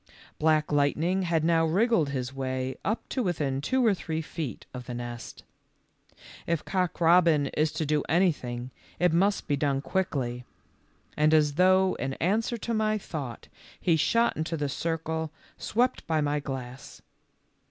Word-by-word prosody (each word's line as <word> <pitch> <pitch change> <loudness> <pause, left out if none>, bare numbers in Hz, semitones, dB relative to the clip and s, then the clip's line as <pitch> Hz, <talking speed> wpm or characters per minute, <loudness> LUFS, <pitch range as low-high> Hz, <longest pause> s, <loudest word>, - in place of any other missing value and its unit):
Black 155 -1 +2
Lightning 150 +6 +2
had 170 -3 +1
now 165 0 +3
wriggled 190 0 +2
his 130 -1 -3
way 130 -1 -3
up 215 +3 -2
to 260 - -1
within 150 - -1
two 255 - +1
or 220 - +5
three 160 -4 -3
feet 155 -4 -6
of 125 -1 -8
the 125 - -5
nest. 120 -1 -7 1.0
If 170 -2 -1
Cock 185 -3 -1
robin 165 -4 +4
is 155 0 +1
to 160 - -2
do 150 0 +1
anything 130 -8 0 0.3
it 180 -2 +2
must 195 +4 +2
be 145 - +2
done 140 -1 0
quickly, 135 -5 -2 0.7
and 155 +1 +4
as 150 -2 +3
though 185 +3 +4
in 135 0 -2
answer 220 +7 0
to 230 +1 -3
my 215 -1 +1
thought 145 - -6 0.3
he 170 - +3
shot 230 +9 +2
into 165 +1 -2
the 145 -1 -1
circle 160 +1 -2 0.3
swept 245 +4 0
by 160 -1 +1
my 150 0 0
glass. 130 -2 -7
160 Hz, 155 wpm, -27 LUFS, 140-180 Hz, 1.0 s, or